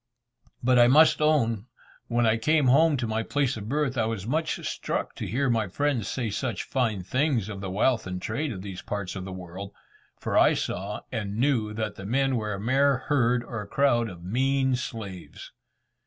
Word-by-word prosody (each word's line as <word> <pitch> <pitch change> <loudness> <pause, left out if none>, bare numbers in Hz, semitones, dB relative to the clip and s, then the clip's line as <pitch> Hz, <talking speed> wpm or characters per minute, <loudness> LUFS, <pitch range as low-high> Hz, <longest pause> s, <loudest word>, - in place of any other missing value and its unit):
But 125 0 +4
I 120 - +7
must 155 +5 +5
own, 115 -8 +2 0.4
when 120 0 +1
I 110 0 +3
came 150 +6 +2
home 150 +4 +5
to 120 - -2
the 110 0 -1
place 140 -1 0
of 105 -2 -7
my - - -7
birth, 140 -3 0
I 110 - +2
was 110 -4 -3
much 155 +6 -1
struck - - -3
to - - -5
hear 135 +4 0
my 115 -4 +1
friends 130 +1 -1
say 120 -5 -2
such 115 -1 -2
fine 115 -8 -1
things 125 - 0
of 100 -2 -6
the 95 - -4
wealth 110 +3 +1
and 90 0 -4
trade 130 +10 -2
of 95 -4 -7
these 95 -3 -7
parts 100 -3 -4
of 95 -1 -5
the 95 - -6
world, 95 +2 -8 0.4
for - - -3
I - - +5
saw - - -3
and 105 -2 -3
knew 120 -4 +1
that 110 -1 -3
the 95 - -8
men 135 +3 +1
were 105 -3 -2
a - - -7
mere 135 +5 +3
herd 125 -3 +1
or 120 -3 -5
crowd 120 -5 +2
of 85 -3 -11
mean 130 +6 +1
slaves. 110 -7 -7
115 Hz, 200 wpm, -26 LUFS, 105-135 Hz, 0.4 s, I